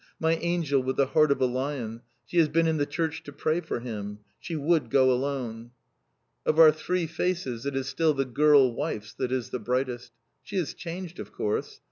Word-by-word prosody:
My 160 0 +2
angel, 165 -5 +1
with 130 +1 -2
the 140 - +3
heart 155 +2 +3
of 140 - +2
a - - +5
lion. 125 -3 -3 0.2
She 175 - 0
has 160 -2 +4
been 165 +2 +2
in 160 -1 +1
the 145 -1 0
church 160 -1 -2
to 145 - -10
pray 155 +4 0
for 155 -7 -4
him! 105 -4 -5 0.2
She 170 - -5
would 155 +2 +1
go 130 -1 +4
alone." 125 -3 -2 0.7
Of 155 - +1
our 160 -1 +9
three 175 +3 -1
faces 160 -7 -2
it 140 - -2
is 135 0 -2
still 155 +2 +1
the 135 0 0
girl 140 0 +5
wife's 115 -6 -4
that 125 -1 -3
is 130 -2 -2
the 125 - -2
brightest. 125 +1 -2 0.3
She 200 - -9
has 175 -5 -1
changed, 175 0 -7
of - - -7
course. 105 - -3
140 Hz, 205 wpm, -27 LUFS, 125-160 Hz, 0.7 s, our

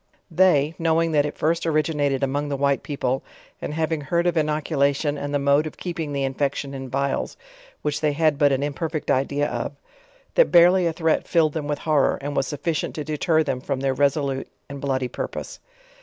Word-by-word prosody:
They, 160 -4 +4
knowing 165 0 +2
that 145 -1 +3
it 150 - -7
first 165 +2 +1
originated 150 -3 +1
among 145 +2 -1
the 140 - -2
white 140 0 +1
people, 135 -2 -2 0.4
and - - -4
having 160 0 -1
heard 170 +5 0
of 175 - +2
innoculation 150 -2 +1
and 145 0 -4
the 145 - +2
mode 140 +2 +2
of 155 - -9
keeping 165 -4 -4
the 140 -1 -1
infection 140 +1 -2
in 135 -1 -6
vials, 140 +1 -2 0.5
which 150 -1 -1
they 150 -2 +2
had 155 -1 +2
but 145 -1 +5
an 135 +1 +1
imperfect 155 +1 -2
idea 140 +2 +1
of, - - -3 0.6
that - - +4
bare 175 +1 +8
ly 190 - +2
a - - -1
threat 160 -1 0
filled 160 -4 +2
them 155 -3 -3
with 145 -1 -1
horror, 150 -2 +2
and 145 +1 -5
was 135 - +1
sufficient 155 +1 -2
to 150 - -3
de 155 +1 -3
ter 160 -2 +3
them 135 -4 -2
from 140 -1 -2
their 135 -1 +1
resolute 140 0 0 0.2
and 140 -1 -8
bloody 130 -2 -1
purpose. - - -6
145 Hz, 200 wpm, -23 LUFS, 140-160 Hz, 0.6 s, bare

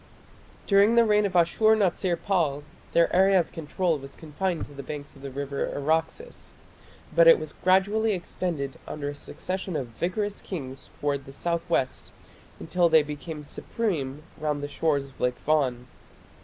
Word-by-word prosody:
During 200 +3 +5
the 235 0 +6
reign 210 -1 +3
of 185 - -8
Ashur 200 +6 +4
natsir 185 -3 +1
pal 155 -7 0 0.3
their 170 +1 +3
area 190 +1 +5
of 170 - -2
control 165 +1 -1
was 135 0 -11
confined 170 +2 -3
to 145 - -14
the 140 - -7
banks 145 +1 -7
of 135 - -15
the 140 - -6
river 140 +1 -3
Araxes, 160 +3 -2 0.6
but 170 0 +7
it 165 - +9
was 155 -1 -7
gradually 205 +4 +2
extended 170 -6 -4
under 145 -1 -4
a 145 - -6
succession 185 +4 -5
of 135 -5 -3
vigorous 190 - -2
kings 135 -7 -7
towards 140 -2 -1
the 135 - -10
south 170 +3 -2
west 130 -6 -1 0.5
until 175 +1 +2
they 160 -1 +6
became 150 +1 -7
supreme 150 -6 -3 0.2
round 150 -2 -1
the - - -2
shores 145 0 0
of 135 -1 -17
Lake 125 0 +1
Van. 135 -5 +1
160 Hz, 165 wpm, -26 LUFS, 140-185 Hz, 0.6 s, it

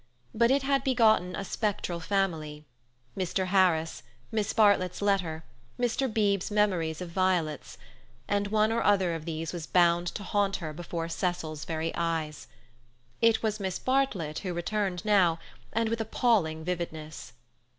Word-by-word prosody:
But 235 +1 +3
it 275 +1 +3
had 275 0 +1
begotten 220 -8 +3
a 195 - -4
spectral 200 -5 -2
family—Mr. 155 -3 -3
Harris, 180 -4 +2 0.3
Miss 215 -1 0
Bartlett's 200 -5 +3
letter, 180 -6 0 0.4
Mr. 245 +1 0
Beebe's 205 -3 +1
memories 185 -6 +1
of 180 - -5
violets—and 175 - -2
one 215 +1 +2
or 230 +1 +1
other 190 -4 +3
of 160 -1 -5
these 165 0 -4
was 170 -3 -5
bound 175 -1 +3
to 205 - -5
haunt 200 0 0
her 155 -4 -5
before 165 0 -4
Cecil's 165 -3 -3
very 160 0 -2
eyes. 160 -3 -2 0.7
It 230 -1 +4
was 215 -1 0
Miss 190 -2 -2
Bartlett 240 - 0
who 180 -3 -4
returned 185 0 -2
now, 190 -6 +4 0.3
and 225 0 0
with 230 0 -1
appalling 200 -9 +1
vividness. 155 -6 -5
180 Hz, 140 wpm, -28 LUFS, 160-210 Hz, 0.7 s, It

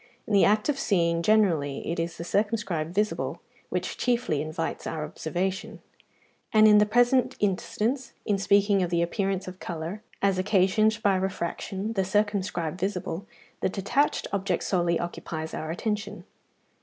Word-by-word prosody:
In 215 - -3
the 200 - +6
act 210 +1 +3
of 285 -2 0
seeing, 170 -7 +2
generally, 170 -8 +2
it 170 - -2
is 165 0 -3
the - - -5
circumscribed 195 -5 -1
visible 210 +3 -1 0.3
which - - -3
chiefly 240 - 0
invites 155 +2 -4
our 155 -1 -3
observation; 185 +5 -3 0.7
and 215 -1 +7
in 210 -1 +7
the 210 - +4
present 245 +3 +3
instance, 220 +6 -1
in 205 -2 +1
speaking 200 0 +3
of 180 - 0
the 170 -1 +2
appearance 195 +1 -1
of 185 0 -8
colour, 170 +5 -5 0.2
as 195 -2 +2
occasioned 210 +3 +3
by 200 -2 +4
refraction, 190 +3 -3
the 195 -3 +1
circumscribed 190 -4 -1
visible, 185 0 -3 0.3
the - - +1
detached 210 +10 0
object 190 -2 0
solely 175 -2 +1
occupies 160 -2 -5
our 155 - -4
attention. 210 +5 -3
195 Hz, 150 wpm, -27 LUFS, 170-210 Hz, 0.7 s, and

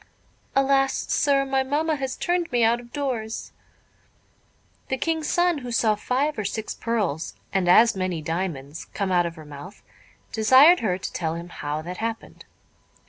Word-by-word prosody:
"Alas! 270 0 +3 0.2
sir, 280 -1 +2
my 270 0 +1
mamma 300 +4 0
has 265 -2 -4
turned 350 -1 -1
me 240 -1 +2
out 230 +1 +3
of 240 0 -14
doors." 245 -6 -3 1.4
The 265 - -1
King's 320 +1 -1
son, 350 -3 +2
who 250 -2 -7
saw 230 -2 +3
five 255 +6 -1
or - - -1
six 220 +2 -3
pearls, 205 -10 -2 0.2
and 190 -2 +1
as 225 +5 +6
many 185 -3 -2
diamonds, 160 -3 -4
come 195 -2 -1
out 175 -1 +3
of 165 - -7
her 155 -2 -11
mouth, 150 +6 -11 0.5
desired 260 +10 +6
her 185 -5 0
to 190 - -6
tell 165 -2 -2
him 170 +1 -7
how 150 -2 -4
that 180 +2 -6
happened. 225 0 -5
225 Hz, 165 wpm, -24 LUFS, 180-270 Hz, 1.4 s, as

